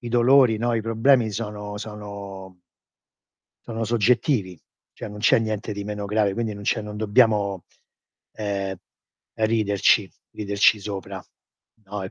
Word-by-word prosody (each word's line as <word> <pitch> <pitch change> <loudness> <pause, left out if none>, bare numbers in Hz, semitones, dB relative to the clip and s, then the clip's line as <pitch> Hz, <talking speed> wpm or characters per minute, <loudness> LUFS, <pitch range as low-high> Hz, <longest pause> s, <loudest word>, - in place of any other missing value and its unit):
i 120 - -6
dolori, 120 -1 +4
no, 120 0 0
i 115 - 0
problemi 115 +1 +3
sono 105 -1 -5
sono 100 -3 -8 1.1
sono 115 -1 -4
soggettivi, 110 - +1 0.4
cioè - - -7
non 105 - -9
c'è 110 +2 +4
niente 110 -1 -3
di 100 0 -5
meno 105 0 -4
grave, 105 -1 +1
quindi 110 0 -3
non 100 - -9
c'è 110 +2 0
non 105 0 -7
dobbiamo, 105 -3 +2 0.7
ehm, 100 -2 -3 0.6
ehm, 110 - +1
riderci, 100 -2 +2 0.2
riderci 100 0 +2
sopra, 100 -1 -6 0.6
no, 100 0 -5
e 95 - -6
105 Hz, 140 wpm, -24 LUFS, 100-115 Hz, 1.1 s, dolori